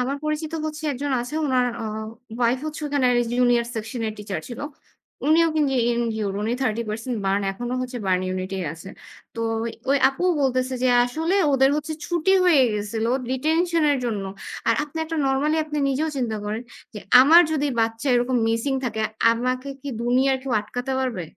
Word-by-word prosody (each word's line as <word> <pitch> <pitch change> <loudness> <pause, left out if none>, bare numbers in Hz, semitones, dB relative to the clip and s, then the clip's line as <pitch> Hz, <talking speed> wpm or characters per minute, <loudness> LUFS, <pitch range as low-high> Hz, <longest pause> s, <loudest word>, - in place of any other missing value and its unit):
আমার 265 +3 -1
পরিচিত 305 +1 -2
হচ্ছে 305 0 -6
একজন 280 +2 -3
আছে। 245 +5 -6
উনার 255 -2 +2 0.2
আ - - -4 0.5
উয়াইফ 245 +1 +2
হচ্ছে 310 0 -5
ওখানের 265 -4 +2 0.2
জুনিয়র 245 -1 +3
সেকশন 225 +1 -4
এর - - -4
টিচার 205 -1 -4
ছিল। 240 - -7 0.7
উনিও 330 +2 +5
কিন্তু 290 -3 +2 0.2
ইনজিউর 220 -4 -1
উনি 220 +3 -1
30% 225 0 -2
বার্ন 195 +1 +1
এখনো 240 +5 -4
হচ্ছে 250 0 -4
বার্ন 185 -1 +2
ইউনিট 185 0 -3
এই 185 - -3
আছে। 170 +4 -11 0.5
তো 230 - -5 0.5
ওই 280 - +4
আপুও 355 +7 0
বলতেছে 255 0 0
যে 255 - +3 0.2
আসলে 320 +9 -1 0.2
ওদের 270 0 +4
হচ্ছে 305 +1 -3
ছুটি 345 +1 +1
হয়ে 325 -7 +6
গেছিল 210 +2 -2 0.2
ডিটেনশন 320 +5 +1
এর 280 - 0
জন্য। 210 -5 -2 0.4
আর 230 - +5
আপনি 300 +2 -8
একটা 325 +1 -4
নরমালি 280 +4 +1
আপনি 300 -1 -4
নিজেও 290 +4 0
চিন্তা 235 -5 -1
করেন 215 +3 -3 0.3
যে - - -5 0.2
আমার 320 +6 +8
যদি 295 -1 0
বাচ্চা 225 +4 -1
এরকম 245 +1 +1
মিসিং 230 +5 0
থাকে। 220 -2 -2 0.3
আমাকে 255 +3 -1
কি 285 - -6
দুনিয়ার 260 +3 +2
কেউ 265 -2 -3
আটকাতে 245 +5 -5
পারবে? 250 -8 -2
255 Hz, 175 wpm, -23 LUFS, 230-290 Hz, 0.7 s, আমার